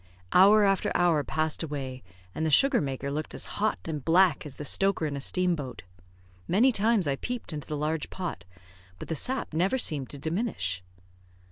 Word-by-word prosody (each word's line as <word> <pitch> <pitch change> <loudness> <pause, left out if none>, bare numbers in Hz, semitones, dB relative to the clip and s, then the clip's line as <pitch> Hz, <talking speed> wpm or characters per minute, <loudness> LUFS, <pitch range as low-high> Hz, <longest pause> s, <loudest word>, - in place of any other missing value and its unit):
Hour 205 +3 +7
after 195 -1 +1
hour 170 -4 +3
passed 155 +1 -1
away, 135 -5 -5 0.3
and 160 - -3
the 160 - +1
sugar 270 - +5
maker 140 -1 -4
looked 155 +2 -4
as - - -4 0.2
hot 215 - +1
and 150 -4 -4
black 170 -2 +3
as 140 - -8
the 150 - -7
stoker 195 +2 +2
in 145 -2 -3
a 140 - -5
steam 180 +4 +2
boat. 135 -5 -7 0.6
Many 230 +9 +4
times 220 -3 +2
I 135 -1 0
peeped 245 - -5
into 150 -1 -6
the 150 - -3
large 155 +1 -2
pot, 180 - -5 0.5
but - - -9
the 160 - -1
sap 255 - -1
never 185 +10 +1
seemed 145 - +2
to 145 - -7
diminish. 160 - -2
160 Hz, 190 wpm, -27 LUFS, 145-195 Hz, 0.6 s, Hour